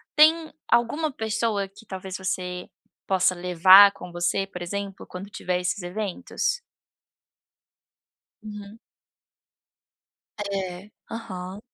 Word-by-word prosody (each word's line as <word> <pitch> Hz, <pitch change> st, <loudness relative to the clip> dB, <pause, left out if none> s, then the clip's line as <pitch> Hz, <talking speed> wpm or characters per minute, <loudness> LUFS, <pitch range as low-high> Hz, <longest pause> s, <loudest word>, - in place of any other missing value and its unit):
Tem 315 Hz, +1 st, +5 dB, 0.2 s
alguma 265 Hz, +7 st, +2 dB
pessoa 220 Hz, -3 st, -1 dB
que 205 Hz, +4 st, -17 dB
talvez 190 Hz, -1 st, -6 dB
você 180 Hz, -1 st, -3 dB, 0.4 s
possa 185 Hz, -1 st, +3 dB
levar 185 Hz, +3 st, +8 dB
com 180 Hz, -, -10 dB
você, 175 Hz, +3 st, 0 dB
por 180 Hz, -2 st, -9 dB
exemplo, 195 Hz, +2 st, -5 dB
quando 185 Hz, +2 st, -8 dB
tiver 180 Hz, -3 st, -2 dB
esses 180 Hz, +2 st, -2 dB
eventos? 220 Hz, -, -2 dB, 1.8 s
Uhum. 210 Hz, 0 st, -9 dB, 1.7 s
Eh, 190 Hz, 0 st, -4 dB, 0.2 s
aham. 190 Hz, -4 st, -6 dB
195 Hz, 95 wpm, -25 LUFS, 180-220 Hz, 1.8 s, levar